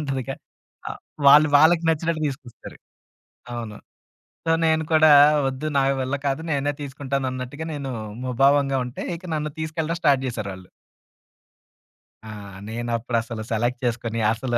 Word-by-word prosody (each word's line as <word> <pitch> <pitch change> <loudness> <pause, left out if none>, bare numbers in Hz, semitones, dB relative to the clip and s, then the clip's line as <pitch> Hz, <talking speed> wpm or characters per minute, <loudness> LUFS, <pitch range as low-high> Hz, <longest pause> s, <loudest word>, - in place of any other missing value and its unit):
ఉంటదిగా. 135 -2 -3 0.5
ఆహ్, - - -7 0.3
వాళ్ళు 150 +2 +8
వాళ్ళకి 165 +2 +5
నచ్చినట్టు 160 0 -1
తీసుకొస్తారు. 130 -3 -10 0.8
అవును. 110 -3 -6 0.7
సో, - - +3
నేను 160 0 +2
కూడా 155 -1 +6 0.4
వద్దు 135 +3 -4
నా 135 - +4 0.2
వల్ల 130 +2 -1
కాదు 135 +3 -1
నేనే 145 0 0
తీసుకుంటానన్నట్టుగా 135 +1 -4
నేను 140 -2 -5 0.3
ముభావంగా 135 +2 +3
ఉంటే 125 - -7
ఇక 180 - -18
నన్ను 150 0 -2
తీసుకెళ్ళడం 160 +1 -2
స్టార్ట్ 140 -4 +3
చేసారాళ్ళు. 100 -6 -6 1.6
ఆ! - - -6 0.4
నేనప్పుడసలు 115 -1 -3
సెలెక్ట్ 120 +3 0
చేసుకొని 115 -1 -2
అసలు 120 +1 -2
135 Hz, 120 wpm, -23 LUFS, 120-150 Hz, 1.6 s, వాళ్ళు